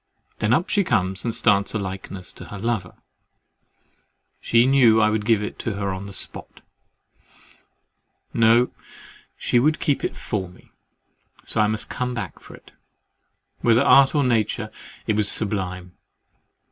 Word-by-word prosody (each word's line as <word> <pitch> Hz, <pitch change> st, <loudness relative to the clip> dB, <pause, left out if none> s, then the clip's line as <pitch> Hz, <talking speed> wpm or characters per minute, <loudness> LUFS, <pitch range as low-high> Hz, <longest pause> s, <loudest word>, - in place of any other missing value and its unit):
Then 105 Hz, -, 0 dB
up 160 Hz, +8 st, +2 dB
she 205 Hz, -, +1 dB
comes 95 Hz, -, -1 dB
and 120 Hz, -, -1 dB
starts 100 Hz, -1 st, +1 dB
a -, -, +2 dB
likeness 95 Hz, -1 st, -7 dB
to -, -, -11 dB
her 100 Hz, -, -9 dB
lover: 115 Hz, 0 st, -3 dB, 1.4 s
she 115 Hz, +1 st, +3 dB
knew 125 Hz, -5 st, +5 dB
I 110 Hz, -1 st, +3 dB
should 105 Hz, -1 st, -2 dB
give 110 Hz, -2 st, +2 dB
it 105 Hz, -, -6 dB
her 100 Hz, -3 st, -3 dB
on 95 Hz, +1 st, -7 dB
the -, -, -9 dB, 2.2 s
spot—"No, 115 Hz, +2 st, +4 dB, 0.7 s
she 120 Hz, -, +1 dB
would 155 Hz, +5 st, +2 dB
keep 145 Hz, -, 0 dB
it -, -, -3 dB
for 95 Hz, -5 st, -4 dB
me!" 90 Hz, -, -20 dB, 0.7 s
So 110 Hz, -, 0 dB
I 105 Hz, -, +3 dB
must 110 Hz, 0 st, -2 dB
come 125 Hz, -1 st, -3 dB
back 120 Hz, -, -6 dB
for -, -, -13 dB
it. -, -, -19 dB, 0.9 s
Whether 120 Hz, +2 st, +3 dB
art 140 Hz, +1 st, +5 dB
or 145 Hz, -, +3 dB
nature, 110 Hz, -2 st, 0 dB, 0.3 s
it 110 Hz, -1 st, 0 dB
is 105 Hz, -, +4 dB
sublime. 90 Hz, -4 st, -1 dB
110 Hz, 145 wpm, -22 LUFS, 100-120 Hz, 2.2 s, knew